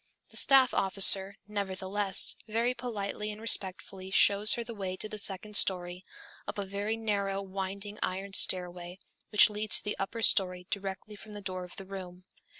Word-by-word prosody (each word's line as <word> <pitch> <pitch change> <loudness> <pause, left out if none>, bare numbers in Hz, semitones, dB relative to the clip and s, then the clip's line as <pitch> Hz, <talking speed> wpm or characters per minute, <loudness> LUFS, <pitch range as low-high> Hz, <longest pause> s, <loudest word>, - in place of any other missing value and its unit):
The - - -11
staff 265 -2 +5
officer, 195 0 +5
nevertheless, 195 -1 +2
very 230 +3 0
politely 210 -4 -5
and 210 - -10
respectfully 190 -3 -3
shows 200 +2 +4
her 235 - -4
the 235 0 -8
way 190 -3 -5
to 215 - -5
the 215 0 -6
second 205 +1 -4
story, 180 -2 +2 0.4
up - - -6
a 200 - -3
very 200 +3 -3
narrow 200 -3 -2
winding 195 +2 -6
iron 195 +1 -4
stairway 180 -1 +1 0.3
which 210 0 +5
leads 210 -1 0
to - - -2
the 210 - -3
upper 220 +4 -4
story 180 -3 +1
directly 195 +1 -5
from 210 +1 -13
the 205 - -7
door 185 -1 -5
of 180 - -12
the 195 - -10
room. 185 -2 -9
195 Hz, 170 wpm, -29 LUFS, 190-210 Hz, 0.4 s, staff